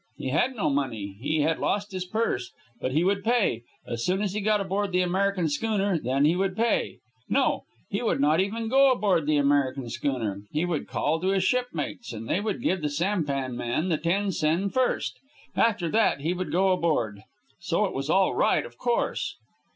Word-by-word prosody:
He 130 - -3
had 250 - +1
no 205 -9 0
money. 110 -8 -2
He 155 +3 0
had 160 +2 +1
lost 205 0 -1
his 185 -1 -4
purse. 215 - -1 0.3
But 130 - -2
he 155 +4 +3
would 200 +1 +1
pay. 225 - +2 0.2
As 120 0 -4
soon 190 +3 +1
as 195 -2 -1
he 210 - -2
got 210 +1 +2
aboard 195 +1 -1
the 180 0 +2
American 190 -1 +1
schooner, 195 +3 0
then 135 +2 +1
he 160 +3 +4
would 190 +1 -1
pay. 230 0 +1 0.3
No; - - +1 0.2
he - - -2
would - - 0
not 150 +4 +3
even 220 +4 -1
go 270 +3 +5
aboard 195 - +1
the 155 -1 +3
American 140 -3 +1
schooner. 120 -6 -2
He 155 +3 0
would 170 -4 -2
call 160 +2 0
to 185 - -1
his 195 -1 +2
shipmates, 180 - -2
and 115 0 -7
they 175 - +1
would 215 +3 -3
give 190 - +1
the 150 - 0
sampan 145 -6 -1
man 120 +9 -1
the 160 - +2
ten 195 +5 0
sen 170 +4 +1
first. 255 -1 0 0.4
After 205 -7 +2
that 215 -7 +2
he 165 +4 0
would 185 0 -4
go 190 +2 +3
aboard. 135 - 0 0.4
So - - 0
it - - -3
was 135 +2 -3
all 190 +2 +3
right, - - +2
of - - -13
course. 480 +1 -1
180 Hz, 200 wpm, -26 LUFS, 145-200 Hz, 0.4 s, go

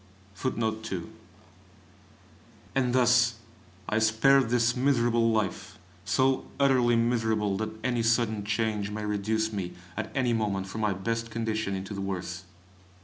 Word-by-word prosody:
And 130 -2 +1
thus 120 -1 +4 0.5
I 110 - +1
spared 115 +4 +4
this 120 0 +2
miserable 120 -3 +2
life 110 -3 -2 0.3
so 130 +7 +1
utterly 130 -4 +4
miserable 110 -3 +1
that 110 +1 -2
any 120 -2 0
sudden 115 -2 +1
change 105 -1 -1
may 105 0 -4
reduce 110 +2 -1
me 95 -4 -4 0.2
at - - -4
any 125 -3 +2
moment 100 -4 -1
from 100 +3 -6
my 105 -2 +1
best 115 +4 -3
condition 110 -3 -2
into 95 +2 -5
the 100 - -4
worst. 90 -1 -4
110 Hz, 125 wpm, -28 LUFS, 105-120 Hz, 0.5 s, thus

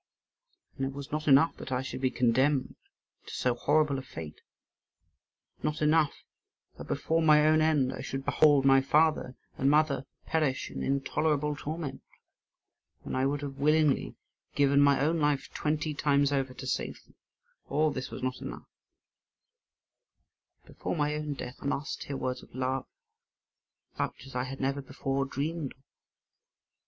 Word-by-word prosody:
And 135 - -1
it 135 - -6
was 140 -1 -8
not 155 +1 -3
enough 140 +4 +5
that - - -8
I 125 0 0
should 130 - -6
be 130 - +2
condemned 130 +3 +2 0.5
to - - -8
so 125 - +1
horrible 145 +3 +2
a - - -5
fate; 80 - -9 1.2
not 150 0 -1
enough 155 -1 +2 0.6
that - - -8
before 165 +1 0
my 150 -1 +6
own 155 0 +5
end 150 -5 +2
I - - -6
should 135 0 -5
behold 145 -3 +4
my 135 0 +6
father 150 -2 +2 0.2
and 135 - +3
mother 145 -3 +2 0.2
perish 150 -5 0
in - - -5
intolerable 150 +2 0
torment, 155 0 -5 1.0
when - - -4
I 130 +1 +2
would 145 +1 -2
have 140 -1 -6
willingly 150 -1 +2 0.4
given 140 0 +4
my 140 -1 +5
own 160 +4 +1
life 145 -2 +1
twenty 155 0 -1
times 145 -1 +2
over 135 -2 -1
to 130 - -8
save 130 - -3
them; - - -25 0.6
all 155 +2 +2
this 130 -1 -4
was - - -8
not 130 0 -2
enough, - - -7 2.0
but - - -17
before - - -2
my 150 -1 0
own 150 -1 -3
death 125 -1 -7
I - - -9
must 140 +2 -3
hear 140 - -4
words 130 -1 -3
of - - -16
love 130 0 -2 1.1
such 125 - -4
as 135 - -12
I 125 0 -1
had 135 +1 -7
never 135 +1 -1
before 135 0 -2
dreamed 145 +2 -3
of. 135 - -34
140 Hz, 160 wpm, -29 LUFS, 135-150 Hz, 2.0 s, my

